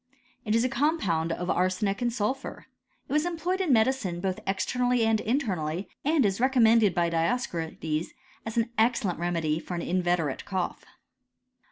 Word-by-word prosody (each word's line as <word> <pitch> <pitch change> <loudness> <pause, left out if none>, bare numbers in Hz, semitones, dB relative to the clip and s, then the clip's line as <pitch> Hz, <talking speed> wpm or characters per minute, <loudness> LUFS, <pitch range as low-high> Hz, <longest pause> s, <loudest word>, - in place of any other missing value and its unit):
It 215 0 +1
is 230 - +3
a - - +3
compound 250 - 0
of 175 +2 -2
arsenic 185 +3 0
and 240 -1 +1
sulphur. 240 +4 -3 0.4
It - - -5
was 300 0 +3
em* 345 -1 -3
ployed 365 +4 -1
in 355 -6 +1
medicine 220 -7 +2
both 185 0 -2
externally 245 +5 +1
and 225 -1 +2
internally, 190 - -1
and 300 -3 +3
is 195 +2 0
recommended 230 -6 +4
by 170 -1 +1
Dioscorides, 165 -4 -1 0.4
as 225 +1 -6
an 230 +1 +1
excellent 220 -6 +1
re 175 - -1
medy 160 -2 0
for 180 - -6
an 170 - -3
inveterate 175 -5 0
cough. 190 -3 -3
210 Hz, 165 wpm, -27 LUFS, 175-250 Hz, 0.4 s, recommended